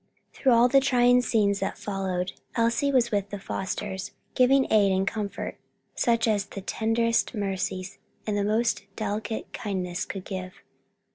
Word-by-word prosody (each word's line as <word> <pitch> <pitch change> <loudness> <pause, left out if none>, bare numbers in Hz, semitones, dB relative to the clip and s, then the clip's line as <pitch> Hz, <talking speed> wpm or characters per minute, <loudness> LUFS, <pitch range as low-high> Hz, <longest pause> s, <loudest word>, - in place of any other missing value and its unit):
Through 260 -3 +3
all 235 +1 +6
the 275 +2 +5
trying 250 -2 +4
scenes 205 -4 +2
that 195 - -2
followed, 190 -2 -2 0.2
Elsie 235 +4 +2
was 245 -3 +3
with 200 -1 0
the 205 - -5
Fosters, 190 0 -4 0.2
giving 265 +1 +4
aid 205 -2 +5
and 190 +1 +1
comfort 210 -2 -4 0.3
such 230 -1 +2
as 210 -2 +2
the 195 - -7
tenderest 230 +3 +1
sympathy 195 -3 -2 0.4
and 210 - -1
most 220 -1 +1
delicate 215 +1 -3
kindness 185 -5 -3
could 190 -2 -6
give. 185 -1 -5
210 Hz, 145 wpm, -26 LUFS, 195-235 Hz, 0.4 s, all